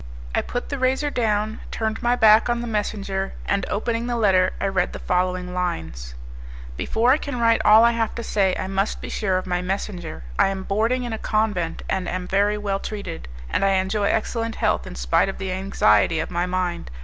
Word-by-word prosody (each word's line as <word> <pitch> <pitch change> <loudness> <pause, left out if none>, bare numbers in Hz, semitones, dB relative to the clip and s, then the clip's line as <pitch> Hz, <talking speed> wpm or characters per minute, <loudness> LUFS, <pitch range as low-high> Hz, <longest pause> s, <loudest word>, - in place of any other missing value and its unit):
I - - +2
put 245 - -5
the 280 - -3
razor 265 +3 +1
down, 220 -3 0
turned 220 -1 -2
my 240 +1 +2
back 220 -1 +6
on 240 0 0
the - - -4
messenger, 200 -3 -2
and 200 - 0
opening 230 +2 -1
the 240 - -1
letter 190 -5 +3
I - - -1
read 190 -2 0
the - - -5
following 180 0 -1
lines, 80 - -4 0.6
"Before 230 - +2
I 280 - +5
can 280 -4 -4
write 230 -1 +3
all 215 +2 +7
I 235 - +6
have 230 -2 -1
to 235 - -4
say, 195 -4 +1
I - - -3
must 195 +2 -1
be - - -7
sure 190 -3 0
of 185 - -3
my 180 -1 -1
messenger. 180 - -4 0.2
I - - +5
am 195 -1 -3
boarding 225 +6 0
in 240 -2 -4
a 220 - -4
convent, 205 -7 -1
and 185 -2 -1
am 180 0 -3
very 205 +2 +2
well 200 -2 -2
treated, 200 - -6 0.2
and 190 - 0
I 195 0 +3
enjoy 190 +2 0
excellent 225 +2 -1
health - - 0
in - - -8
spite 60 - +2
of 195 - -5
the 190 -1 -4
anxiety 170 - +2
of - - -3
my 175 +1 0
mind. 180 -2 -2
200 Hz, 210 wpm, -23 LUFS, 185-225 Hz, 0.6 s, all